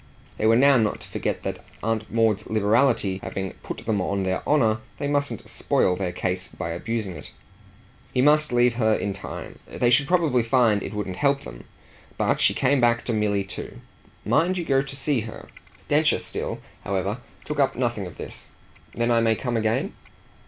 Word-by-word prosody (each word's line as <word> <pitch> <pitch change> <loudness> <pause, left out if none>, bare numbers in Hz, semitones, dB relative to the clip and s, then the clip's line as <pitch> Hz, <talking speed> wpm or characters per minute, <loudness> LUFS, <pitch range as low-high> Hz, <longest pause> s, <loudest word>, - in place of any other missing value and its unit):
They 110 - +2
were 115 - +6
now 135 +2 +6
not 110 -3 +1
to - - -11
forget - - -3
that, - - -4 0.2
Aunt 110 0 -1
Maud's 110 -3 +2
liberality 110 -2 +2
having 95 -1 -4
put - - -7
them 110 -3 +1
on 100 +1 -1
their 95 0 -1
honour, 115 -7 +3 0.2
they 145 - -2
mustn't 140 -5 -1
spoil 90 - +1
their 90 -1 -2
case 90 +1 -2
by 85 -2 -5
abusing 105 +2 -3
it. 75 - -10 0.8
He - - -1
must 150 +2 +4
leave 120 0 +4
her 110 -3 +3
in 100 - -2
time; 100 - -8
they 120 -1 +1
should 140 +3 +4
probably 165 -8 +3
find 115 -3 +3
it 105 - -6
would 105 - -2
help 140 +9 +1
them. - - -10 0.5
But - - +1
she - - +3
came 140 -2 +2
back 120 0 +3
to 120 - -1
Milly 105 -2 +1
too. 95 - -8 0.5
"Mind 180 +4 +2
you 175 - -2
go 135 -3 +3
to 135 0 -8
see 140 -1 0
her." 110 0 -9 0.4
Densher - - +3
still, - - -3 0.2
however, 100 +3 -2 0.3
took 150 -1 -4
up 140 - +3
nothing 120 -6 -1
of 90 - -12
this. - - -9 0.5
"Then 120 0 +1
I 115 -1 +4
may 115 -1 +3
come 120 +1 -3
again?" 110 0 0
115 Hz, 190 wpm, -24 LUFS, 100-135 Hz, 0.8 s, were